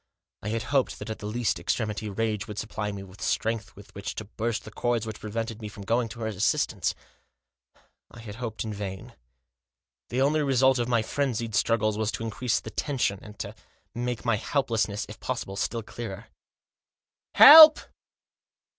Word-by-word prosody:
I 105 Hz, -, -4 dB
had 115 Hz, +1 st, -2 dB
hoped 135 Hz, -2 st, +1 dB
that 105 Hz, +2 st, -6 dB
at 110 Hz, -, -6 dB
the 105 Hz, -, -6 dB
last 120 Hz, 0 st, -1 dB
extremity 110 Hz, -2 st, -2 dB
rage 105 Hz, 0 st, -2 dB
would 105 Hz, -2 st, -8 dB
supply 105 Hz, -1 st, -4 dB
me 100 Hz, -1 st, -7 dB
with 95 Hz, 0 st, -14 dB
strength 110 Hz, -1 st, -2 dB
with 100 Hz, -, -15 dB
which 100 Hz, +1 st, -6 dB
to 110 Hz, -, -6 dB
burst 115 Hz, +2 st, -3 dB
the 110 Hz, -, -9 dB
cords 120 Hz, -1 st, -1 dB
which 110 Hz, -1 st, -7 dB
prevented 115 Hz, +1 st, -5 dB
me 105 Hz, -, -5 dB
from 105 Hz, -1 st, -10 dB
going 115 Hz, +2 st, +1 dB
to 115 Hz, +2 st, -10 dB
her -, -, -2 dB
assistance. 105 Hz, -2 st, 0 dB, 1.1 s
I -, -, -14 dB
had 110 Hz, -1 st, -9 dB
hoped 120 Hz, -3 st, -4 dB
in 110 Hz, -2 st, -5 dB
vain. 95 Hz, -2 st, -7 dB, 1.0 s
The 130 Hz, +2 st, +1 dB
only 150 Hz, +2 st, +2 dB
result 130 Hz, -2 st, +3 dB
of 120 Hz, 0 st, -1 dB
my 120 Hz, -2 st, +2 dB
frenzied 120 Hz, -3 st, -2 dB
struggles 110 Hz, 0 st, +1 dB
was 110 Hz, 0 st, 0 dB
to -, -, -4 dB
increase 115 Hz, +1 st, -1 dB
the 110 Hz, -, -9 dB
tension, 125 Hz, -7 st, -1 dB
and 105 Hz, -1 st, -12 dB
to -, -, -6 dB, 0.4 s
make 120 Hz, -1 st, -4 dB
my 120 Hz, -3 st, +2 dB
helplessness, 110 Hz, -5 st, -1 dB
if -, -, -11 dB
possible, 95 Hz, -, -4 dB
still 115 Hz, +3 st, -2 dB
clearer. 110 Hz, -1 st, -8 dB, 0.6 s
" -, -, -40 dB
Help 310 Hz, +1 st, +11 dB
110 Hz, 180 wpm, -26 LUFS, 105-120 Hz, 1.1 s, Help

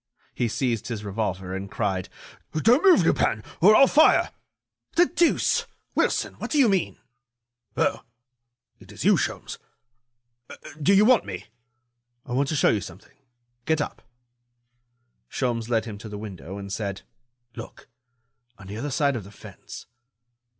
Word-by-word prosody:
He 120 Hz, -, -1 dB
seized 115 Hz, -2 st, -2 dB
his 115 Hz, -3 st, -5 dB
revolver, 95 Hz, -3 st, -3 dB
and 95 Hz, +1 st, -6 dB
cried: 95 Hz, -5 st, -2 dB, 0.5 s
"Don't 235 Hz, -, +4 dB
move, 380 Hz, -3 st, +6 dB
Lupin, -, -, +1 dB, 0.2 s
or 215 Hz, -, +7 dB
I'll 275 Hz, -, +8 dB
fire." 300 Hz, +3 st, +4 dB, 0.6 s
"The 350 Hz, -, +6 dB
deuce! 345 Hz, -1 st, +1 dB, 0.3 s
Wilson, -, -, 0 dB
what -, -, -5 dB
do 305 Hz, -, -1 dB
you 270 Hz, -4 st, +6 dB
mean?" 195 Hz, -4 st, 0 dB, 0.8 s
"Oh! -, -, +1 dB, 0.8 s
it -, -, -16 dB
is -, -, -7 dB
you, -, -, +6 dB
Sholmes. -, -, -3 dB, 1.2 s
Do 145 Hz, -, +3 dB
you 205 Hz, +2 st, +6 dB
want 250 Hz, 0 st, +5 dB
me?" 90 Hz, -2 st, -6 dB, 0.8 s
"I 130 Hz, -, -10 dB
want 135 Hz, +3 st, 0 dB
to 155 Hz, -, -1 dB
show -, -, +3 dB
you 105 Hz, -, +1 dB
something. 90 Hz, +3 st, -12 dB, 0.5 s
Get 160 Hz, 0 st, +1 dB
up." 150 Hz, -, -4 dB, 1.3 s
Sholmes 120 Hz, -3 st, -2 dB
led 115 Hz, -2 st, +1 dB
him 105 Hz, -3 st, -8 dB
to 110 Hz, -, -9 dB
the 105 Hz, -, -7 dB
window, 100 Hz, -3 st, -8 dB
and 100 Hz, -1 st, -7 dB
said: 100 Hz, -2 st, -4 dB, 0.5 s
"Look!... 115 Hz, -, -10 dB, 0.7 s
on 100 Hz, -, -13 dB
the 100 Hz, +2 st, -7 dB
other 145 Hz, +6 st, -4 dB
side 140 Hz, 0 st, +1 dB
of 115 Hz, -, -4 dB
the 100 Hz, -, -13 dB
fence...." -, -, -12 dB
115 Hz, 150 wpm, -25 LUFS, 100-155 Hz, 1.3 s, I'll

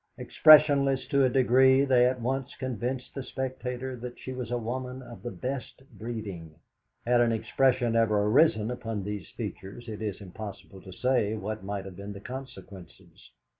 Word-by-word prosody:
Expressionless 140 Hz, -4 st, +5 dB
to 140 Hz, -2 st, +3 dB
a -, -, +3 dB
degree, 130 Hz, +2 st, +4 dB
they 125 Hz, -2 st, +4 dB
at 130 Hz, 0 st, -1 dB
once 135 Hz, +3 st, -3 dB
convinced 130 Hz, 0 st, -4 dB
the 135 Hz, -, -5 dB
spectator 130 Hz, -1 st, -4 dB
that 125 Hz, 0 st, -8 dB
she 130 Hz, -, -7 dB
was 125 Hz, -3 st, -5 dB
a 120 Hz, -, -1 dB
woman 125 Hz, +2 st, -5 dB
of 120 Hz, -1 st, -11 dB
the 120 Hz, -, -5 dB
best 130 Hz, +1 st, -6 dB
breeding. 100 Hz, -9 st, -7 dB, 0.5 s
Had 120 Hz, 0 st, +4 dB
an 120 Hz, -1 st, +3 dB
expression 120 Hz, +1 st, +1 dB
ever 110 Hz, -3 st, +3 dB
arisen 110 Hz, -1 st, +3 dB
upon 115 Hz, -4 st, -4 dB
these 105 Hz, -3 st, -5 dB
features, 100 Hz, +6 st, -7 dB
it 110 Hz, -1 st, -6 dB
is 105 Hz, -3 st, -3 dB
impossible 100 Hz, 0 st, -9 dB
to 95 Hz, -, -11 dB
say 120 Hz, 0 st, +1 dB
what 110 Hz, 0 st, -5 dB
might 100 Hz, 0 st, -4 dB
have 95 Hz, -2 st, -10 dB
been 100 Hz, +1 st, -7 dB
the 100 Hz, -, -9 dB
consequences. 100 Hz, -7 st, -11 dB
120 Hz, 170 wpm, -28 LUFS, 105-130 Hz, 0.5 s, Expressionless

